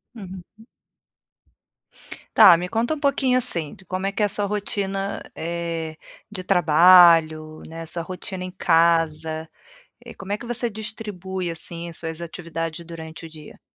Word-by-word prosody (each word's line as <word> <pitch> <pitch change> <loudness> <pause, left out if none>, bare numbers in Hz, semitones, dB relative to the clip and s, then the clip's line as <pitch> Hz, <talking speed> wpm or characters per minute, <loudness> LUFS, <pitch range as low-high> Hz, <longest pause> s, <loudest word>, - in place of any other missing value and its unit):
Uhum. 195 +2 -11 1.7
Tá, 175 - +9
me 180 +1 -4
conta 230 +7 0
um 310 - -5
pouquinho, 270 -3 +2
assim, 170 - 0
de - - -14
como 185 +2 -4
é 195 - 0
que 205 - -4
é - - +5
a - - -1
sua 205 +1 -1
rotina, 200 -1 -3
eh, 165 -1 -4 0.3
de 185 -3 -5
trabalho, 165 -3 +5
né, 165 +1 -8
sua 170 +1 -4
rotina 185 +1 -6
em 185 - -6
casa, 165 -2 +1 0.6
eh, - - -10
como 195 +1 -7
é 210 - -1
que - - -9
você 240 0 -2
distribui, 205 -4 -5
assim, 170 +1 -6
suas 160 0 -6
atividades 165 0 -5
durante 160 -1 -9
o - - -8
dia? 155 -2 -13
175 Hz, 155 wpm, -23 LUFS, 165-200 Hz, 1.7 s, Tá